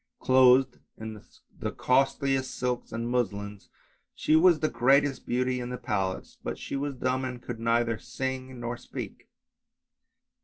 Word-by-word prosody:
Clothed 130 Hz, 0 st, +5 dB, 0.2 s
in 110 Hz, -1 st, -7 dB, 0.4 s
the -, -, -2 dB
costliest 135 Hz, 0 st, +1 dB
silks 125 Hz, -1 st, -2 dB
and 115 Hz, +1 st, -3 dB
muslins 105 Hz, -4 st, -2 dB, 0.5 s
she 155 Hz, -, +2 dB
was 165 Hz, 0 st, +6 dB
the 155 Hz, -, +1 dB
greatest 135 Hz, +2 st, +2 dB
beauty 125 Hz, +1 st, 0 dB
in 120 Hz, 0 st, -4 dB
the 125 Hz, -, -4 dB
palace, 100 Hz, -6 st, -3 dB
but -, -, -3 dB
she -, -, -5 dB
was 140 Hz, 0 st, -2 dB
dumb 130 Hz, +1 st, -1 dB
and 125 Hz, -1 st, -4 dB
could 120 Hz, -1 st, -7 dB
neither 115 Hz, -1 st, +1 dB
sing 130 Hz, -1 st, -5 dB
nor 120 Hz, 0 st, -4 dB
speak. -, -, -8 dB
125 Hz, 145 wpm, -28 LUFS, 115-130 Hz, 0.5 s, was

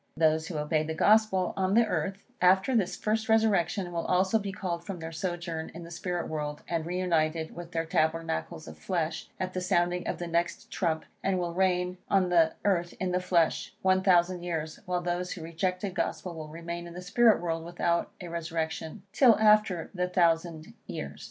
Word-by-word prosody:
Those 160 Hz, 0 st, +3 dB
who 165 Hz, -, -4 dB
obeyed 155 Hz, +1 st, 0 dB
the 160 Hz, -, -3 dB
Gospel 205 Hz, -1 st, +3 dB
on 190 Hz, +1 st, +1 dB
the 235 Hz, 0 st, +6 dB
earth, 195 Hz, -2 st, -2 dB, 0.2 s
after 190 Hz, +7 st, +4 dB
this 195 Hz, -5 st, +1 dB
first 220 Hz, +1 st, -1 dB
resurrection, 195 Hz, -5 st, +2 dB
will 170 Hz, -1 st, -3 dB
also 190 Hz, +4 st, +3 dB
be 200 Hz, -1 st, -4 dB
called 175 Hz, -3 st, -4 dB
from 190 Hz, +1 st, -5 dB
their 165 Hz, -1 st, -6 dB
sojourn 170 Hz, -1 st, -4 dB
in 170 Hz, -, -7 dB
the 170 Hz, -, -10 dB
spirit 175 Hz, 0 st, -3 dB
world, 150 Hz, -1 st, -4 dB
and 165 Hz, -1 st, -2 dB
re 180 Hz, +1 st, -2 dB
united 160 Hz, -3 st, 0 dB
with 175 Hz, 0 st, -8 dB
their 165 Hz, -1 st, -1 dB
tabernacles 160 Hz, 0 st, -1 dB
of -, -, -10 dB
flesh, 170 Hz, -4 st, -2 dB
at 185 Hz, 0 st, -3 dB
the 185 Hz, -, -2 dB
sounding 180 Hz, -1 st, +1 dB
of -, -, -2 dB
the 175 Hz, -, -4 dB
next 170 Hz, 0 st, -2 dB
trump, 160 Hz, -4 st, -1 dB, 0.2 s
and 195 Hz, -1 st, +1 dB
will 175 Hz, -1 st, -2 dB
reign 180 Hz, 0 st, +1 dB
on 190 Hz, -2 st, +3 dB
the 165 Hz, -2 st, +4 dB
earth 175 Hz, -4 st, +1 dB
in 185 Hz, -1 st, -1 dB
the 180 Hz, -, +1 dB
flesh, 175 Hz, -3 st, +1 dB
one 190 Hz, 0 st, +4 dB
thousand 180 Hz, -1 st, +3 dB
years, 160 Hz, -3 st, -4 dB
while 180 Hz, -1 st, 0 dB
those 175 Hz, +1 st, -2 dB
who 165 Hz, -, -8 dB
rejected 180 Hz, +4 st, -2 dB
the -, -, -16 dB
Gospel 180 Hz, -1 st, -2 dB
will 160 Hz, -2 st, -7 dB
remain 170 Hz, +2 st, -6 dB
in 170 Hz, -, -10 dB
the 180 Hz, -, -6 dB
spirit 225 Hz, +4 st, +4 dB
world 165 Hz, -1 st, -2 dB
without 170 Hz, 0 st, 0 dB
a 180 Hz, -, -7 dB
resurrection, 165 Hz, +2 st, -4 dB
till 240 Hz, -2 st, +6 dB
after 210 Hz, -5 st, +3 dB
the 180 Hz, -1 st, -1 dB
thousand 165 Hz, -2 st, +1 dB
years. 70 Hz, 0 st, -6 dB
175 Hz, 195 wpm, -29 LUFS, 165-185 Hz, 0.2 s, the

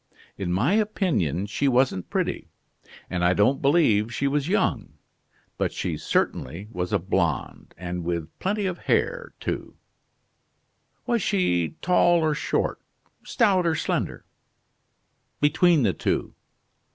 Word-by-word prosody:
"In 90 Hz, -3 st, -3 dB
my 115 Hz, -, +2 dB
opinion 160 Hz, -, 0 dB
she 125 Hz, +7 st, -1 dB
wasn't 130 Hz, -8 st, +1 dB
pretty, -, -, -2 dB, 0.6 s
and 90 Hz, -1 st, -2 dB
I 90 Hz, +1 st, +3 dB
don't 110 Hz, +8 st, +3 dB
believe 125 Hz, -8 st, +3 dB
she 140 Hz, +4 st, -1 dB
was 145 Hz, +1 st, 0 dB
young, 190 Hz, -, 0 dB, 0.7 s
but -, -, 0 dB
she -, -, -3 dB
certainly 85 Hz, +11 st, -2 dB
was 90 Hz, -2 st, -3 dB
a -, -, +3 dB
blonde, -, -, -2 dB
and 90 Hz, 0 st, -5 dB
with 85 Hz, -2 st, -2 dB
plenty 205 Hz, +2 st, -1 dB
of 185 Hz, -2 st, -2 dB
hair -, -, -1 dB
too." -, -, -4 dB, 1.3 s
"Was 235 Hz, -3 st, +1 dB
she 90 Hz, -, +1 dB
tall 175 Hz, -1 st, +4 dB
or 155 Hz, -1 st, +2 dB
short, 150 Hz, -, -1 dB, 0.4 s
stout 195 Hz, -7 st, +2 dB
or 160 Hz, -, +2 dB
slender?" -, -, -2 dB, 1.1 s
"Between 160 Hz, +1 st, +4 dB
the 100 Hz, -5 st, +2 dB
two." -, -, -2 dB
140 Hz, 125 wpm, -25 LUFS, -, 1.3 s, tall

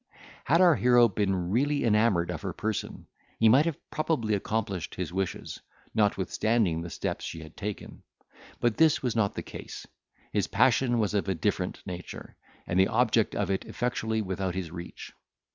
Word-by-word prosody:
Had 165 Hz, +6 st, +4 dB
our 175 Hz, -2 st, +7 dB
hero 120 Hz, -1 st, +5 dB
been 95 Hz, -3 st, -1 dB
really 140 Hz, +5 st, +1 dB
enamoured 105 Hz, -6 st, +2 dB
of -, -, -5 dB
her -, -, -4 dB
person, 110 Hz, -1 st, -4 dB, 0.3 s
he 115 Hz, -, +4 dB
might 135 Hz, +7 st, +6 dB
have 165 Hz, -4 st, -1 dB
probably 155 Hz, -9 st, 0 dB
accomplished 100 Hz, -2 st, -2 dB
his -, -, -4 dB
wishes, 95 Hz, -1 st, -3 dB, 0.3 s
notwithstanding 105 Hz, -3 st, +1 dB
the 85 Hz, -, -6 dB
steps -, -, -4 dB
she 80 Hz, -, -6 dB
had 80 Hz, -, -13 dB
taken. 105 Hz, 0 st, -6 dB, 0.6 s
But 120 Hz, -2 st, +1 dB
this 160 Hz, -3 st, +4 dB
was 125 Hz, -3 st, -1 dB
not 105 Hz, -3 st, +1 dB
the -, -, -4 dB
case. -, -, -9 dB, 0.5 s
His -, -, +1 dB
passion 120 Hz, -2 st, +3 dB
was 105 Hz, -2 st, 0 dB
of 100 Hz, -1 st, 0 dB
a 95 Hz, -, +1 dB
different 90 Hz, +2 st, -2 dB
nature, 90 Hz, -1 st, -8 dB, 0.3 s
and 90 Hz, -, 0 dB
the 95 Hz, -, +5 dB
object 115 Hz, -2 st, +2 dB
of 100 Hz, -1 st, -1 dB
it 95 Hz, -, -1 dB
effectually 110 Hz, -2 st, -2 dB
without 95 Hz, -1 st, -3 dB
his 90 Hz, -4 st, -4 dB
reach. 85 Hz, 0 st, -9 dB
105 Hz, 170 wpm, -28 LUFS, 95-120 Hz, 0.6 s, our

